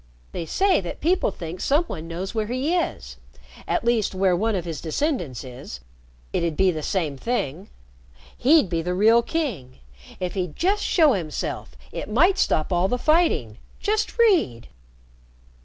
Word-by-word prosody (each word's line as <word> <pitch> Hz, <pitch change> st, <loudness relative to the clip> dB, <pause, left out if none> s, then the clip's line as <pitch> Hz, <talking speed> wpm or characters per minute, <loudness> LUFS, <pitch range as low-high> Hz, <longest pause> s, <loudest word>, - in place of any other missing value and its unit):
They 165 Hz, -, -5 dB
say 385 Hz, -, +2 dB
that 175 Hz, -, -6 dB
people 355 Hz, -3 st, +2 dB
think 175 Hz, -2 st, -7 dB
some 295 Hz, +5 st, +2 dB
one 165 Hz, -, -7 dB
knows 180 Hz, +5 st, -5 dB
where 220 Hz, -2 st, -1 dB
he 260 Hz, +8 st, -1 dB
is 350 Hz, -, -3 dB, 0.5 s
at -, -, 0 dB
least 230 Hz, -5 st, +1 dB
where 185 Hz, -1 st, +3 dB
one 220 Hz, +4 st, 0 dB
of 180 Hz, -3 st, -3 dB
his 165 Hz, -4 st, -5 dB
descendants 170 Hz, -, -2 dB
is. 125 Hz, -, -9 dB, 0.5 s
It'd 170 Hz, -3 st, -1 dB
be 190 Hz, -1 st, +4 dB
the 155 Hz, -2 st, -4 dB
same 155 Hz, -4 st, -1 dB
thing. 190 Hz, -, -3 dB, 0.7 s
He'd 295 Hz, -2 st, +4 dB
be 170 Hz, -2 st, -1 dB
the 180 Hz, +2 st, -2 dB
real 225 Hz, +5 st, +5 dB
king. 235 Hz, -, -3 dB, 0.4 s
If 180 Hz, -1 st, -3 dB
he'd 180 Hz, -5 st, -3 dB
just 400 Hz, +4 st, +1 dB
show 315 Hz, -6 st, +4 dB
himself, 160 Hz, -6 st, -4 dB, 0.2 s
it -, -, -6 dB
might 355 Hz, -, +3 dB
stop 155 Hz, +4 st, +1 dB
all 175 Hz, +2 st, +2 dB
the 250 Hz, -, 0 dB
fighting. 305 Hz, -, +1 dB, 0.2 s
Just 430 Hz, +2 st, -1 dB
read." 365 Hz, -, +2 dB
195 Hz, 160 wpm, -24 LUFS, -, 0.7 s, real